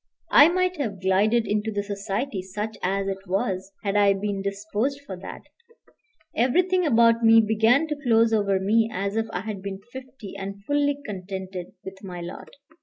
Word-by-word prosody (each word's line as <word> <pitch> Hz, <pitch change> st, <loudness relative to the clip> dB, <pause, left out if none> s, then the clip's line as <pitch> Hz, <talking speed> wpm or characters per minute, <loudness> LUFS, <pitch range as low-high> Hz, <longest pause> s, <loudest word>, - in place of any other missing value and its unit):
I 290 Hz, +3 st, +8 dB
might 365 Hz, 0 st, 0 dB
have 220 Hz, -9 st, -3 dB
glided 205 Hz, +5 st, +2 dB
into 210 Hz, +1 st, -1 dB
the 205 Hz, -1 st, -2 dB
society, 200 Hz, +2 st, -3 dB
such 205 Hz, +4 st, -5 dB
as 195 Hz, +1 st, -1 dB
it 195 Hz, 0 st, -3 dB
was, 190 Hz, +1 st, -2 dB
had 200 Hz, -1 st, -1 dB
I 200 Hz, -1 st, +5 dB
been 195 Hz, 0 st, -3 dB
disposed 210 Hz, +7 st, -2 dB
for 190 Hz, -, -6 dB
that; 185 Hz, -, -9 dB, 0.9 s
everything 360 Hz, +8 st, +2 dB
about 230 Hz, -2 st, +4 dB
me 225 Hz, 0 st, +7 dB
began 220 Hz, +6 st, +3 dB
to 300 Hz, -2 st, -5 dB
close 230 Hz, -3 st, +3 dB
over 200 Hz, -3 st, +2 dB
me 220 Hz, +4 st, +2 dB
as 200 Hz, +1 st, -3 dB
if 225 Hz, 0 st, 0 dB
I 180 Hz, -, -3 dB
had 210 Hz, -2 st, -6 dB
been 195 Hz, 0 st, -6 dB
fifty, 260 Hz, -5 st, -10 dB
and 200 Hz, +1 st, -7 dB
fully 285 Hz, +1 st, +1 dB
contented 190 Hz, -2 st, -6 dB
with 195 Hz, +1 st, -9 dB
my 180 Hz, -2 st, -7 dB
lot. 175 Hz, +1 st, -8 dB
210 Hz, 175 wpm, -25 LUFS, 195-230 Hz, 0.9 s, I